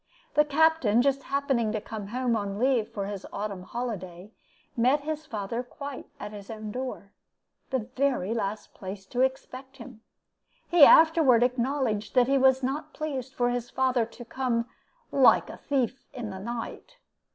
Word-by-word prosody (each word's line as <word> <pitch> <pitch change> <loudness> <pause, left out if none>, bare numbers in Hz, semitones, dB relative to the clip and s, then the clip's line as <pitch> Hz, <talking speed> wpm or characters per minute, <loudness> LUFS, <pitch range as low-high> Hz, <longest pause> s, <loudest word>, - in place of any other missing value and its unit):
The 300 - +4
Captain, 295 -6 +3
just 275 0 +1
happening 270 -5 0
to 215 - -1
come 210 -1 -7
home 245 +2 0
on 200 -2 -3
leave 245 -2 +2
for 200 -2 -4
his 200 -1 -5
autumn 200 -2 -4
holiday, 190 -4 -6 0.4
met 255 +4 +3
his 310 +1 -4
father 220 -1 -3
quite 280 +2 -8
at 210 - -6
his 205 -2 -10
own 215 -1 -6
door 250 -5 -5 0.6
the 255 -5 -2
very 255 -7 +1
last 210 -2 -3
place 190 0 -8
to 245 +6 -2
expect 265 0 -3
him. 235 -3 -11 0.7
He 345 -3 +6
afterward 315 -7 +6
acknowledged 245 -4 -1
that 250 -1 +6
he 275 0 +3
was 265 0 +4
not 275 +4 -3
pleased 270 -4 -4
for 245 0 +1
his 245 -1 -3
father 255 -2 +1
to 240 +1 -12
come 235 -1 -1 0.5
'like 270 -2 +5
a - - -10
thief 265 -2 -1
in 225 -5 -5
the 190 - -7
night.' 235 - -6
245 Hz, 165 wpm, -27 LUFS, 215-270 Hz, 0.7 s, He